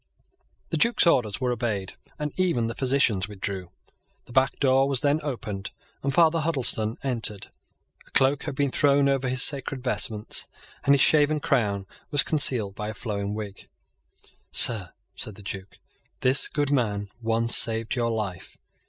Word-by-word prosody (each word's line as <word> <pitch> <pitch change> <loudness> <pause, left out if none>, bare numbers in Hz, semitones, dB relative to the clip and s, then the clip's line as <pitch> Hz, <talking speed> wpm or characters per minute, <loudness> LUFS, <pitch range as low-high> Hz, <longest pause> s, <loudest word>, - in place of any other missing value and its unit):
The - - 0
Duke's 235 -3 +2
orders 120 -11 +2
were 125 -1 -1
obeyed; 110 -5 -3 0.2
and 150 -1 -4
even 175 -11 0
the 115 - -3
physicians 125 -8 +1
withdrew. 95 -3 -5 0.6
The - - -16
back 130 +2 +1
door 135 -1 +3
was 135 -3 +3
then 145 +1 +1
opened; 110 -9 -5 0.3
and 140 - -1
Father 165 +2 +3
Huddleston 130 -8 0
entered. 115 -6 -2 0.6
A - - -19
cloak 135 +1 +1
had - - -5
been 140 -1 0
thrown 140 0 +2
over 135 -2 0
his 130 +1 +4
sacred 135 -2 0
vestments; 110 -4 0 0.4
and 140 - +5
his 140 - +1
shaven 150 0 +3
crown 105 -9 -1 0.2
was 145 - +8
concealed 125 -10 +1
by 105 +1 -6
a 110 - -7
flowing 105 -2 -4
wig. 105 -2 -8 0.8
"Sir," 105 -7 +6 0.3
said 105 - -7
the 100 - -14
Duke, 95 0 -8 0.5
"this 130 +2 +3
good 145 -1 -2
man 105 -7 -1
once 115 +1 +1
saved 115 0 +1
your 120 -3 -1
life. 100 -5 -5
125 Hz, 160 wpm, -25 LUFS, 105-140 Hz, 0.8 s, was